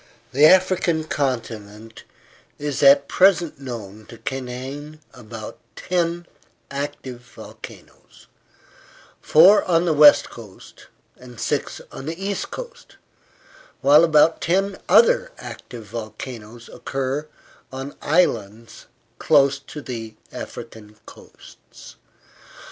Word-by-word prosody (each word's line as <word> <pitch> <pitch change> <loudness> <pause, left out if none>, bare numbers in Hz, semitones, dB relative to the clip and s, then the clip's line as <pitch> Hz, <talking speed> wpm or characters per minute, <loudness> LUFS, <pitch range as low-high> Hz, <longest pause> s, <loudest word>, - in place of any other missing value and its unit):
The 145 +4 +6
African 180 -3 +3
continent 115 -7 -5 0.5
is 145 -2 -4
at 140 0 +6
present 175 -6 +3
known 110 -5 -8
to 115 - -12
contain 135 +5 -6
about 115 -3 -10 0.2
ten 175 -1 -2 0.5
active 140 -3 -6
volcanoes 120 0 -14 1.0
four 185 +7 +6
on 170 -1 +2
the 165 - +2
west 150 -1 +6
coast, 110 -5 -14 0.3
and 125 -2 -14
six 140 +4 -2
on 135 - -9
the 165 +2 -5
east 195 +1 -3
coast, 485 -1 -10 0.9
while 145 +3 +6
about 160 0 +4
ten 195 +3 0
other - - +4
active 115 -3 -10
volcanoes 115 +1 -9
occur 135 +3 -4 0.4
on 135 +2 -7
islands 115 - -1 0.3
close 140 -2 +3
to 150 +1 -10
the 115 -3 -7 0.2
African 110 -2 -9
coasts. - - -16
140 Hz, 100 wpm, -22 LUFS, 115-165 Hz, 1.0 s, The